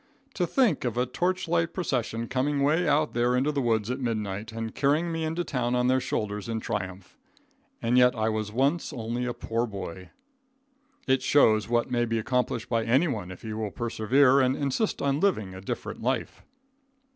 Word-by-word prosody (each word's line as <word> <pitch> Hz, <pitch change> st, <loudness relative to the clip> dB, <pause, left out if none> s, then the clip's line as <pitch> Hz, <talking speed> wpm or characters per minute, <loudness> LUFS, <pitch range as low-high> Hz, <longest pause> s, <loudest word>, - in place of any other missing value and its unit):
To 180 Hz, -3 st, 0 dB
think 235 Hz, -, +2 dB
of 120 Hz, -2 st, -2 dB
a 125 Hz, -, +2 dB
torchlight 170 Hz, +3 st, 0 dB
procession 120 Hz, -9 st, -2 dB
coming 140 Hz, +3 st, 0 dB
way 155 Hz, +5 st, +2 dB
out 150 Hz, +1 st, +2 dB
there 120 Hz, +1 st, +2 dB
into 135 Hz, +4 st, +2 dB
the 145 Hz, -2 st, -1 dB
woods 115 Hz, -2 st, +1 dB
at 130 Hz, -, -3 dB
midnight, 110 Hz, -3 st, -3 dB
and 115 Hz, 0 st, -5 dB
carrying 150 Hz, +5 st, +1 dB
me 165 Hz, 0 st, -2 dB
into 160 Hz, +2 st, -1 dB
town 125 Hz, -5 st, -1 dB
on 125 Hz, 0 st, +2 dB
their 130 Hz, +1 st, +3 dB
shoulders 105 Hz, -4 st, -3 dB
in 115 Hz, -1 st, -1 dB
triumph! 95 Hz, -3 st, -5 dB, 0.6 s
And 120 Hz, +2 st, +3 dB
yet 125 Hz, 0 st, +5 dB
I 110 Hz, 0 st, 0 dB
was 110 Hz, -1 st, -2 dB
once 140 Hz, +8 st, +1 dB
only 120 Hz, +1 st, -3 dB
a 120 Hz, -, -2 dB
poor 115 Hz, +2 st, -2 dB
boy! 95 Hz, -3 st, -7 dB, 1.0 s
It 130 Hz, -1 st, +2 dB
shows 110 Hz, -7 st, +4 dB
what 120 Hz, +1 st, +1 dB
may 120 Hz, -1 st, +2 dB
be 115 Hz, 0 st, -1 dB
accomplished 120 Hz, 0 st, -1 dB
by 115 Hz, -2 st, 0 dB
anyone 115 Hz, -, +1 dB
if 95 Hz, -, -10 dB
he 110 Hz, -1 st, -5 dB
will 110 Hz, -1 st, -3 dB
persevere 125 Hz, +5 st, +3 dB
and 130 Hz, 0 st, +3 dB
insist 145 Hz, -, -1 dB
on 140 Hz, 0 st, +1 dB
living 110 Hz, -, 0 dB
a 95 Hz, -, -9 dB
different 95 Hz, -, -5 dB
life. -, -, -2 dB
125 Hz, 185 wpm, -27 LUFS, 110-140 Hz, 1.0 s, yet